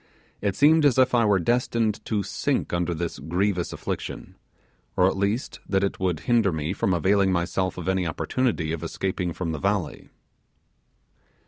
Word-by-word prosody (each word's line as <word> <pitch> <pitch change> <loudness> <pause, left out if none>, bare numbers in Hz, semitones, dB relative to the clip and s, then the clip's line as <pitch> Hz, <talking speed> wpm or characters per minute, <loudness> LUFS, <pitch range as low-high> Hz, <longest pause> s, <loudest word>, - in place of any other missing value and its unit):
It 100 -2 0
seemed 155 +2 +5
as 140 -4 +4
if 130 -1 +4
I 120 -2 +4
were 100 -2 +4
destined 115 +2 0
to 105 -3 -1
sink - - -2
under 85 0 0
this 85 +1 -4
grievous 90 +4 -1
affliction, - - -5 0.6
or 90 - +5
at - - 0
least 100 +6 -2
that 95 0 +2
it 100 - -1
would 90 -4 -1
hinder 115 0 +2
me 80 +2 -2
from 95 - 0
availing 95 +3 +3
myself 95 +1 -1
of 90 -1 -6
any 95 -2 +1
opportunity 85 - -1
of 80 - -4
escaping 90 -2 -2
from 85 0 -3
the 80 - -4
valley. 100 -3 -2
95 Hz, 165 wpm, -25 LUFS, 85-105 Hz, 0.6 s, seemed